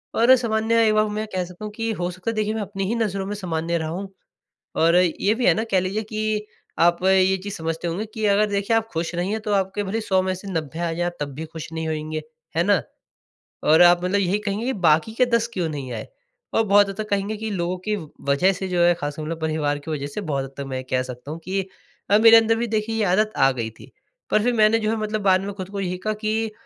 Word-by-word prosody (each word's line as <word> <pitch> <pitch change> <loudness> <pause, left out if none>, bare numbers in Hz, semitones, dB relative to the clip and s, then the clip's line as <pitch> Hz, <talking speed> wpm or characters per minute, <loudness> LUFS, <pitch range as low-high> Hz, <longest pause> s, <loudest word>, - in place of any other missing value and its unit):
और 245 +3 +6
सामान्य 230 -1 +2
एक 215 - +3
बार 215 0 +4
में 210 - -4
मैं 215 0 -2
कह 180 - 0
सकता 180 +4 -9
हूँ 210 - -5
कि 225 -1 -2
हो 175 -2 -2
सकता 185 +6 -4
है - - -7
देखिए 215 0 0
मैं 220 - -2
अपनी 195 -1 -4
ही 230 - 0
नज़रों 200 -4 -1
में 205 +1 -4
सामान्य 170 -3 -2
रहा 160 -1 -3
हूँ। 195 +3 -6 0.6
और 165 +2 +4
ये 180 +4 +2
भी 245 +1 0
है - - +6
ना 220 - -1
कह 185 - +4
लीजिए 195 +4 -2
कि 215 0 -2 0.3
आप 175 +1 +4
ये 190 0 +4
चीज़ 205 - -5
समझते 165 +1 -3
होंगे 195 +7 -3
कि 220 -1 -3
अगर 205 +1 +4
देखिए 200 +3 +1
आप 225 0 0
ख़ुश 165 +1 -2
नहीं 175 +3 -1
हैं 220 - -2
तो 210 -2 -2
आपके 195 +1 0
भले 215 +4 -2
100 190 -3 +1
में 185 0 -1
से 195 +2 -9
90 160 -1 -3
आ 170 -1 -1
जाए 175 +1 -1
तब 140 -1 -3
भी 160 +3 -5
ख़ुश 160 0 -8
नहीं 160 0 -3
होएँगे, 155 0 -3 0.3
हैं 170 - +3
ना? 200 -4 +3 0.8
और 160 +3 +5
आप 175 0 +6
मतलब 195 +2 +1
यही 195 +1 +1
कहेंगे 210 +2 -3
कि 265 - 0
बाकी 170 +3 +2
के 250 - +4
10 235 -1 +1
क्यों 175 -4 -1
नहीं 140 -4 -5
आए। 110 - -6 0.5
और 225 - +3
बहुत 200 0 +5
हद 195 - -5
तक 215 0 -4
कहेंगे 200 +2 -1
कि 220 0 -4
लोगों 180 -1 -2
की 210 - +1
व 160 -6 -7 0.2
वजह 185 +8 +4
से 190 +1 -4
जो 175 -1 +1
है 175 0 +5
ख़ासकर 145 0 -5
मतलब 165 +1 -4
परिवार 150 -2 0
की 160 +2 -7
वजह 140 -2 -3
से, 205 +8 -5
बहुत 140 -6 -2
हद 135 - -11
तक 140 - -3
मैं 130 -1 -4
ये 130 - -5
कह 130 0 +2
सकता 125 +3 -8
हूँ 165 - -6
कि 195 +1 -1 0.5
अ, 205 - +7
मेरे 225 +1 +8
अंदर 225 0 +4
भी 235 +1 -1
देखिए 220 +1 -1
ये 220 - +1
आदत 215 +4 +2
आ 135 0 +5
गई 115 -3 -3
थी। 110 - -16 0.4
पर 215 - +3
फ़िर 245 0 +2
मैंने 220 0 +4
जो 215 0 -1
है - - 0
मतलब 215 0 -2
बाद 190 -1 +4
में 200 +1 -5
खुद 190 -1 -7
को 200 -1 -5
यही 180 -1 -2
कहा 215 +3 -2
कि 220 0 0
190 Hz, 270 wpm, -23 LUFS, 165-215 Hz, 0.8 s, मेरे